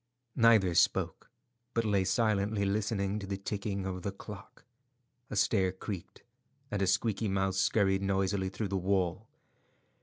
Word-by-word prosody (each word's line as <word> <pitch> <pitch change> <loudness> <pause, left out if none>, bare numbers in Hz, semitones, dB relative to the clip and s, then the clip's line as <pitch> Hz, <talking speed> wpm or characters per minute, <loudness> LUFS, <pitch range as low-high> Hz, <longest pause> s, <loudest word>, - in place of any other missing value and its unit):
Neither 110 -7 +5
spoke, 85 - +1 0.5
but 115 -1 +1
lay 100 -3 +2
silently 100 0 +1
listening 100 0 -1
to 100 - -7
the 100 0 -3
ticking 100 0 -3
of 90 -1 -4
the 100 - -3
clock. 100 +1 -11 0.6
A - - -5
stair 95 -2 +2
creaked, 95 -1 -7 0.5
and 105 -2 -1
a 95 - +2
squeaky 110 +2 +1
mouse 95 -1 0
scurried 95 -2 +2
noisily 95 0 0
through 100 +1 -4
the 100 - 0
wall. 95 +2 0
100 Hz, 145 wpm, -31 LUFS, 95-105 Hz, 0.6 s, Neither